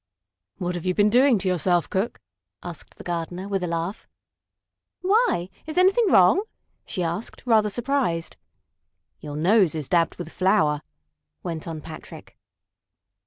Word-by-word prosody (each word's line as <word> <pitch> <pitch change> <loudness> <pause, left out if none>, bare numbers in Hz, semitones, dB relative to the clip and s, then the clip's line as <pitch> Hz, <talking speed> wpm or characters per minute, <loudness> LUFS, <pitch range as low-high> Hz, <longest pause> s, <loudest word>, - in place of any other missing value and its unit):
"What 180 -2 -2
have 175 -2 -5
you 180 - +1
been 210 0 +4
doing 255 +1 +5
to 195 - -3
yourself, 175 -2 +2
Cook?" 200 +4 -2 0.4
asked - - -9
the - - -10
gardener, 175 +2 -4
with 195 -2 -1
a 180 - -2
laugh. 170 +4 -3 0.9
"Why? 375 - +2 0.2
Is 315 - -5
anything 390 +6 +5
wrong?" 190 - +6 0.5
she 180 - -2
asked, 170 +6 -4
rather 220 -3 +4
surprised. 240 -7 -1 0.8
"Your 145 -1 -7
nose 180 +2 +3
is 150 -4 -3
dabbed 170 0 +2
with 170 -2 -7
flour," 160 -6 +2 0.6
went 165 -1 -5
on 160 -2 -5
Patrick. 155 +1 -11
185 Hz, 140 wpm, -24 LUFS, 165-220 Hz, 0.9 s, wrong